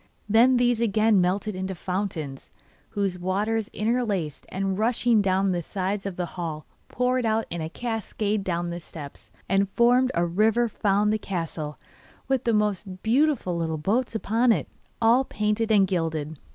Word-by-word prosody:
Then 235 +4 +5
these 245 -1 +2
again 215 -2 +3
melted 195 +4 0
into 190 0 -4
fountains, 175 -7 -4 0.4
whose 195 -4 -2
waters 205 +4 -1
interlaced 210 - -2
and, 195 0 -1
rushing 225 +1 +2
down 195 0 +2
the 175 -1 -1
sides 195 +3 -3
of 195 - -5
the 180 - -2
hall, 165 -3 -5 0.2
poured 250 0 0
out 225 0 +1
in 170 -1 -3
a 160 - -3
cascade 215 -1 -2
down 175 -2 -2
the 170 - -4
steps, 155 -4 -10 0.2
and 195 +1 +2
formed 245 +4 +4
a 170 +1 +2
river 220 +7 +2
found 210 -1 +1
the 215 - 0
castle, 165 -6 -4 0.5
with 265 -2 0
the 235 - +3
most 200 -3 -1
beautiful 250 - +2
little 165 -1 -1
boats 225 +10 0
upon 230 +3 +2
it, - - 0 0.3
all 235 +3 +4
painted 210 -1 -1
and 200 -3 +5
gilded. 160 -5 -2
200 Hz, 160 wpm, -25 LUFS, 180-225 Hz, 0.5 s, Then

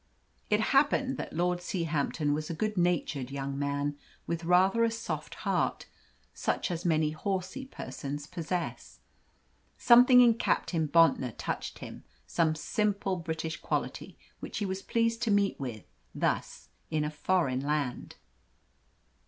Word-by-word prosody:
It 210 +1 +3
happened 275 -1 +3
that - - -5
Lord 175 +2 0
Seahampton 160 -5 -1
was 155 +1 -3
a 165 - -3
good 215 +5 -1
natured 170 -7 0
young 135 0 -4
man, 145 0 -1 0.3
with 170 0 -3
rather 190 +6 +4
a 230 - +4
soft 230 0 -5
heart, - - 0 0.5
such - - -1
as 170 0 -3
many 155 -3 +2
horsey 190 - -3
persons 145 - -6
possess. 170 +3 -4 0.8
Something 250 +1 +7
in 240 -2 +7
Captain 160 -3 +1
Bontnor 150 -7 +3
touched - - -4
him; - - -9 0.2
some 160 -2 +1
simple 200 +3 0
British 160 -1 -4
quality - - -3 0.2
which - - -6
he 205 - -1
was 190 0 -3
pleased 230 +1 0
to 235 - 0
meet 200 -1 +2
with, 120 -7 -5 0.3
thus, - - -2 0.2
in 155 -1 0
a 150 - -2
foreign 150 -4 +1
land. 145 -3 -2
170 Hz, 135 wpm, -30 LUFS, 150-205 Hz, 0.8 s, Something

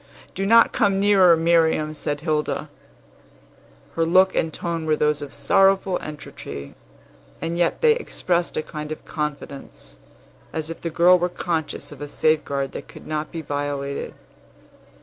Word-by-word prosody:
"Do 195 +1 -2
not 230 +2 +6
come 195 -1 +2
nearer, 195 -4 +5
Miriam!" 160 -2 +2
said 145 -1 -3
Hilda. 155 -2 -1 1.3
Her 165 - +2
look 185 +3 +4
and 160 - 0
tone 165 -1 -4
were 155 - +3
those 150 -1 +1
of 145 -2 -7
sorrowful 190 +6 +3
entreaty, 110 - -8 0.7
and 165 +1 -3
yet 175 - 0
they 470 -1 +6
expressed 175 - -1
a 155 - 0
kind 150 0 -7
of 155 - -7
confidence, 140 - -6 0.5
as 160 0 -3
if 165 - -9
the 170 - -2
girl 175 +3 +5
were 180 +1 0
conscious 165 -4 -3
of 145 -1 -11
a 145 - -4
safeguard 140 -2 0
that - - -8
could - - -13
not 155 0 -3
be 165 -1 -5
violated. 145 -1 -3
160 Hz, 150 wpm, -23 LUFS, 150-175 Hz, 1.3 s, not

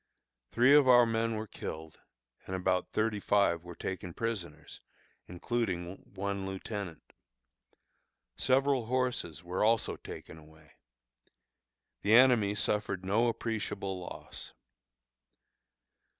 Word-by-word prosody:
Three 125 +4 +5
of 145 -2 +6
our 120 -1 +7
men 115 0 0
were 110 0 -3
killed, 80 -6 -8 0.5
and 95 - -3
about 90 0 0
thirty 110 -1 0
five 100 -5 +2
were 85 -1 -9
taken 90 -2 -5
prisoners, 85 -10 -5 0.5
including 90 -2 -3 0.2
one 100 0 -3
lieutenant. 95 -3 -6 1.2
Several 135 -2 +2
horses 125 - -1
were 90 +3 -1
also 115 +1 +2
taken 80 - -10
away. 80 0 -19 1.3
The 105 +2 +4
enemy 120 -5 +5
suffered 100 -2 -1
no 110 +5 +2
appreciable 110 -4 -3
loss. 90 - -9
100 Hz, 105 wpm, -31 LUFS, 90-115 Hz, 1.3 s, our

